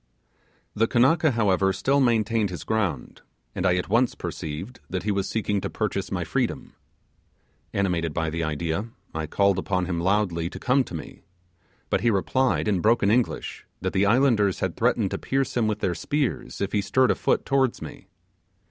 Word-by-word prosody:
The 115 +2 +2
Kanaka, 155 +8 +4
however, 100 -6 +2
still 135 +8 +1
maintained 115 -4 +2
his 90 -5 -6
ground, 110 -5 -2 0.3
and 95 - 0
I 90 - +3
at 90 - -2
once 120 +5 +2
perceived 85 - -6
that 90 -2 -3
he 105 - 0
was 100 -1 -1
seeking 105 -3 -1
to - - -3
purchase - - -2
my - - -1
freedom. - - -2 1.0
Animated 90 -5 0
by 80 0 -2
the 85 +1 -2
idea, 80 +5 -2 0.3
I 80 -1 -3
called 100 +3 +2
upon 90 -1 -1
him 85 -2 -2
loudly 90 -2 +1
to - - -9
come 130 +1 +2
to 85 - -8
me; 80 - -8 0.7
but - - +2
he 120 - +3
replied, 125 +5 +1
in 100 -4 +2
broken 105 -1 +3
English, 120 +1 -1
that 95 0 -3
the 100 +1 +3
islanders 115 -4 +3
had - - -2
threatened - - +1
to - - -3
pierce 135 -1 -1
him 120 -3 +2
with 105 0 -2
their 90 - +1
spears, 140 - -2
if 100 0 -1
he 105 - +1
stirred 130 +6 +3
a - - +1
foot - - 0
towards 135 -3 +1
me. - - -10
100 Hz, 185 wpm, -25 LUFS, 90-120 Hz, 1.0 s, Kanaka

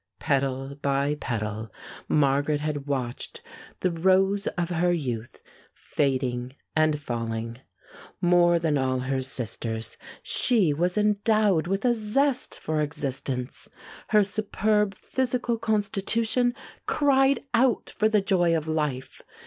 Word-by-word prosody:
Petal 135 0 -1
by 140 +1 +1
petal, 110 -5 -4 0.4
Margaret 145 +1 +2
had 150 -1 -3
watched 130 -4 -4 0.4
the 185 - +1
rose 190 +4 +2
of 175 0 -1
her 175 +1 +2
youth 125 -9 -4 0.3
fading 130 -2 -1 0.2
and 155 -1 +2
falling. 115 -3 -4 0.6
More 175 -1 +4
than 160 -4 +1
all 130 -1 0
her 130 +1 -1
sisters, 115 -3 -4 0.3
she 210 -11 +3
was 175 +6 0
endowed 210 -4 +2
with 195 +5 -1
a 245 - +4
zest 250 +5 0
for 155 -1 -1
existence. 135 -4 -4 0.4
Her 210 -2 +4
superb 210 0 0
physical 245 0 -1
constitution 225 +3 +1 0.3
cried 275 -1 +3
out 240 0 +2
for 215 - +2
the 215 -2 +3
joy 175 -4 +2
of 155 0 -5
life. 150 -5 -2
160 Hz, 115 wpm, -26 LUFS, 135-210 Hz, 0.6 s, More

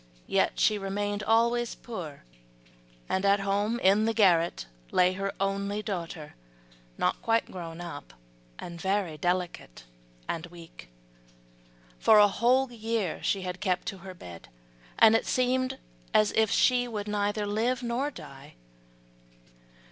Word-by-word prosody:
Yet - - +1
she 210 -1 +3
remained 205 +1 -2
always 235 +2 +2
poor, 175 - -8 0.8
and 190 - -1
at 200 0 +3
home 205 +4 0
in 200 +3 +4
the 225 0 0
garret 175 - +3 0.2
lay 180 0 +3
her 195 +1 -3
only 200 +1 -1
daughter, 170 -7 -5 0.6
not - - 0
quite 230 0 +1
grown 170 -2 -7
up, 165 -4 -8 0.5
and 170 -1 -8
very 190 -4 0
delicate 175 - -3 0.4
and 165 +1 -4
weak. 165 - -13 1.1
For 220 - +6
a 205 0 +8
whole 245 +5 +2
year 225 -5 -2
she 195 -2 0
had 180 0 -5
kept 185 -3 -1
her 190 -1 -10
bed, 85 - -11 0.5
and 220 0 +7
it 225 - +1
seemed 255 +1 +1 0.4
as 215 -1 +4
if 220 -1 +2
she 245 +2 +3
could 210 -3 -5
neither 205 0 -1
live 235 +5 -1
nor 240 +4 -1
die. 135 - -12
200 Hz, 135 wpm, -28 LUFS, 180-225 Hz, 1.1 s, a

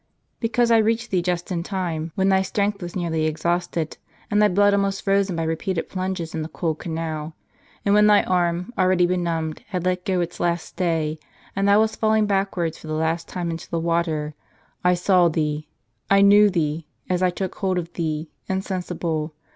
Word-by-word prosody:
" - - -46
Because 235 0 +1
I 230 - +6
reached 225 +1 0
thee 185 -2 +2
just 175 +1 -2
in 170 -2 -1
time: 170 -4 -3
when 190 0 +2
thy 190 0 +4
strength 200 +1 -1
was 175 0 -6
nearly 160 -3 0
exhausted, 170 0 -2 0.3
and 210 0 +3
thy 210 - +6
blood 205 +1 +4
almost 195 -1 0
frozen 195 -2 +2
by 165 - -1
repeated 165 +2 -2
plunges 185 -3 -3
in 160 - -2
the 155 - -5
cold 160 -3 -2
canal; 160 -1 -4 0.5
and 200 - +3
when 210 0 +6
thy 210 -1 +6
arm, 180 +3 0
already 185 -1 +3
benumbed, 170 -3 -1
had 180 -4 -3
let 180 0 0
go 185 -1 0
its 175 0 -3
last 170 -1 0
stay, 160 -3 -1 0.4
and 195 0 +1
thou 200 +1 +6
wast 220 0 -1
falling 220 -1 +3
backwards 195 -5 -1
for - - -11
the 155 - -3
last 160 +2 -1
time 175 -2 -3
into 165 0 -7
the 170 - -1
water. 165 -2 -1 0.5
I 180 0 +4
saw 180 0 +4
thee: 150 -1 -2 0.4
I 195 0 +5
knew 205 +1 +7
thee, 160 -3 -1 0.2
as 180 0 0
I 185 - +4
took 185 +1 -4
hold 190 -2 -1
of 170 -1 -4
thee, 155 -2 -3 0.2
insensible. 175 -5 -3
180 Hz, 195 wpm, -23 LUFS, 165-195 Hz, 0.5 s, knew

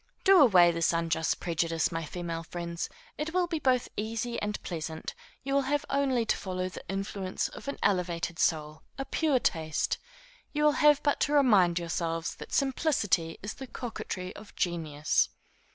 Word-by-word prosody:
Do 385 -3 +7
away 180 -10 +7
this 165 0 +1
unjust 165 -1 0
prejudice, 165 -1 0
my 165 -1 -3
female 170 +1 -4
friends: 170 0 -5 0.3
it 320 +3 -3
will 365 -1 +3
be 335 -2 -2
both 255 -4 +2
easy 225 +2 -3
and 210 0 -2
pleasant; 160 -2 -5 0.3
you 275 +1 -2
will 280 - +4
have 290 0 +1
only 265 -4 +2
to - - +2
follow 185 -1 -3
the - - -9
influence 195 -1 -2
of - - -11
an 280 - -3
elevated 175 -3 0
soul, 155 -1 0 0.2
a 270 - -3
pure 300 -1 +2
taste; 160 -9 0 0.5
you 300 0 0
will 300 - +6
have 295 -1 +6
but 290 - +2
to 295 - +1
remind 205 -12 +5
yourselves 165 -1 -2
that - - -10
simplicity 250 - +1
is 205 - -4
the 265 - -9
coquetry 215 -6 -5
of 210 0 -12
genius. 155 -4 +1
185 Hz, 170 wpm, -29 LUFS, 165-270 Hz, 0.5 s, Do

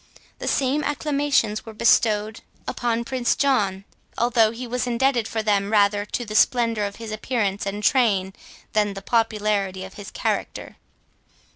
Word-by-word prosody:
The - - -5
same 280 +2 +1
acclamations 285 -7 0
were 225 -1 -10
bestowed 220 -1 +2 0.3
upon 235 -1 -1
Prince 245 -1 0
John, 200 -9 +1 0.3
although 230 -2 +3
he 235 +3 -6
was 250 +1 -2
indebted 245 -1 +1
for 220 -1 -3
them 205 -1 +1
rather 205 -1 +3
to 240 +3 -4
the 215 - -7
splendour 230 -1 +2
of 200 0 -5
his 225 -2 -8
appearance 215 -3 -2
and 205 +1 -4
train, 205 -7 +2 0.4
than 210 -1 +3
to 200 - -5
the 195 - -8
popularity 210 -4 0
of 190 0 -10
his 205 -2 -9
character. - - -3
220 Hz, 155 wpm, -23 LUFS, 205-245 Hz, 0.4 s, although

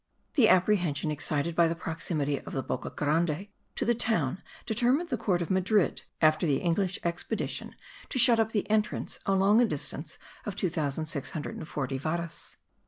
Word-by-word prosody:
The 250 -8 +5
apprehension 175 -6 +2
excited 150 +2 -1
by 170 0 +5
the 165 - -1
proximity 160 -3 -2
of - - -10
the 135 - -2
Boca 130 - -3
Grande 155 +4 0 0.3
to - - -1
the 240 - +3
town 195 - 0 0.2
determined 250 +9 +1
the - - 0
court 185 -5 0
of 170 - -5
Madrid, 190 0 +2 0.2
after 155 +2 +4
the 140 -3 +2
English 180 +4 0
expedition, 170 0 -3 0.3
to - - -2
shut 235 -1 +7
up 220 0 +2
the 210 -3 -1
entrance 215 0 0
along 195 +3 +4
a - - +5
distance 150 -2 -3 0.3
of 205 - -5
2640 155 -3 -2
varas. 165 +2 -4
170 Hz, 155 wpm, -29 LUFS, 150-210 Hz, 0.3 s, shut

